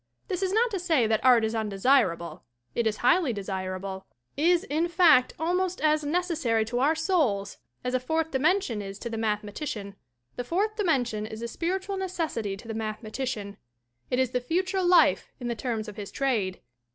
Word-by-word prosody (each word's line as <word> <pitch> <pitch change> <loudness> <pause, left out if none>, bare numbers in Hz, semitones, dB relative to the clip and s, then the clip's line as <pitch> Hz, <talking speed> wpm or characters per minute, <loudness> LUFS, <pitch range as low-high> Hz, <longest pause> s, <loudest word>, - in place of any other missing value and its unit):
This 365 - -2
is 380 -1 0
not 455 +3 +2
to 390 - -2
say 325 -9 +2
that 220 -1 +1
art 245 -3 +6
is 220 - -2
undesirable; 195 - +1 0.3
it 235 -1 +1
is 210 -1 -1
highly 325 -3 +4
desirable, 190 -1 -5 0.3
is, 340 +4 +3
in 325 -2 0
fact, 325 -7 +5
almost 360 +2 0
as 305 0 +2
necessary 300 -9 0
to 240 +2 -2
our 290 +5 +3
souls 295 - 0 0.2
as 250 0 -2
a 255 - +2
fourth 320 +5 -1
dimension 275 - +1
is 195 0 -7
to 235 +2 -6
the - - -3
mathe 215 -2 0
matician. 205 -2 -5 0.4
The 245 - -2
fourth 400 - 0
dimension 245 - 0
is 220 +1 -7
a - - -2
spiritual 380 - -2
neces 365 -4 -2
sity 200 -2 -4
to 225 - -13
the 225 - -4
mathematician; 215 -1 -4 0.5
it 250 - 0
is 260 -2 +1
the 250 - 0
future 370 +8 0
life 355 0 +4
in 245 -2 -4
the 235 - -1
terms 225 -2 -3
of 210 0 -9
his 205 -2 -6
trade. 220 -9 -1
250 Hz, 190 wpm, -27 LUFS, 215-340 Hz, 0.5 s, art